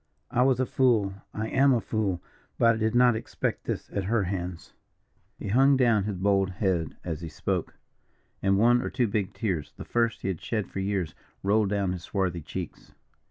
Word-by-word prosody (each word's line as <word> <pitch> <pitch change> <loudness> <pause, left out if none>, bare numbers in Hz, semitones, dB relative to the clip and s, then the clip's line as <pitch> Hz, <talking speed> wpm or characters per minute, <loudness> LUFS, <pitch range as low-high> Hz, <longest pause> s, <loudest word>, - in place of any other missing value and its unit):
I 125 - +2
was 130 -1 +3
a 130 - +2
fool 115 -7 +2 0.2
I 110 +1 -3
am 135 0 +4
a - - +2
fool, 105 -6 -2 0.3
but 115 0 +5
I - - -3
did 110 +1 0
not 120 -1 +5
expect 110 - -3
this - - -3
at 100 -2 -2
her 110 +1 +2
hands." 90 -2 -4 0.6
He 100 - -5
hung 135 +5 +5
down 115 -6 +3
his 105 -3 -3
bold 95 0 +2
head 90 -4 -1
as 85 -2 -4
he 85 - -5
spoke, - - -3 0.7
and 95 0 +3
one 120 +3 +5
or - - -3
two 125 -2 +1
big 100 -2 -1
tears, 95 -10 -2
the - - -7
first 115 -2 0
he - - -1
had 90 -4 -3
shed 110 -4 -2
for - - -4
years, 95 -4 -1 0.3
rolled 105 +1 +3
down 100 -2 0
his 90 -1 -4
swarthy 90 -2 -2
cheeks. 75 - -7
100 Hz, 200 wpm, -27 LUFS, 95-115 Hz, 0.7 s, but